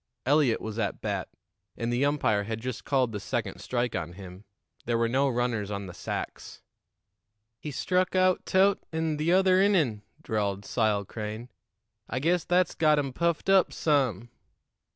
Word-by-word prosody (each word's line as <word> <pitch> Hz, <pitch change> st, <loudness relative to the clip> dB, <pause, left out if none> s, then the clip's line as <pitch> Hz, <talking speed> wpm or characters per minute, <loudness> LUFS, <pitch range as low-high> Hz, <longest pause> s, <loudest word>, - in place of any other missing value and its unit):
Eliot 140 Hz, -3 st, +3 dB
was 110 Hz, +1 st, -5 dB
at 100 Hz, -3 st, -2 dB
bat, -, -, -3 dB, 0.5 s
and 115 Hz, +1 st, -2 dB
the 125 Hz, +3 st, +1 dB
umpire 110 Hz, -8 st, +1 dB
had 110 Hz, +1 st, -4 dB
just 125 Hz, 0 st, -5 dB
called 130 Hz, -4 st, +1 dB
the 105 Hz, -, -4 dB
second -, -, -3 dB
strike 120 Hz, -1 st, -2 dB
on 85 Hz, -2 st, -4 dB
him. 95 Hz, +1 st, -11 dB, 0.4 s
There 120 Hz, 0 st, +1 dB
were 115 Hz, 0 st, +2 dB
no 135 Hz, +4 st, +2 dB
runners 120 Hz, -4 st, -1 dB
on 100 Hz, -1 st, -4 dB
the 90 Hz, -, -8 dB
sacks. -, -, -6 dB, 1.0 s
"He 150 Hz, -, -6 dB
struck 185 Hz, +7 st, 0 dB
aout 185 Hz, 0 st, +3 dB
Tut 195 Hz, +1 st, +3 dB
in 160 Hz, -2 st, -1 dB
t'other 185 Hz, +4 st, +4 dB
innin'," 160 Hz, -, +2 dB, 0.2 s
drawled 100 Hz, -2 st, -2 dB
Sile 105 Hz, -4 st, +1 dB
Crane. 110 Hz, +3 st, -6 dB, 0.6 s
"I -, -, -3 dB
guess 165 Hz, +5 st, +1 dB
that's 180 Hz, 0 st, +2 dB
got 155 Hz, -1 st, +3 dB
him 140 Hz, -3 st, -1 dB
puffed 170 Hz, +4 st, 0 dB
up 195 Hz, -2 st, +4 dB
some." 130 Hz, -, 0 dB
125 Hz, 160 wpm, -28 LUFS, 110-160 Hz, 1.0 s, t'other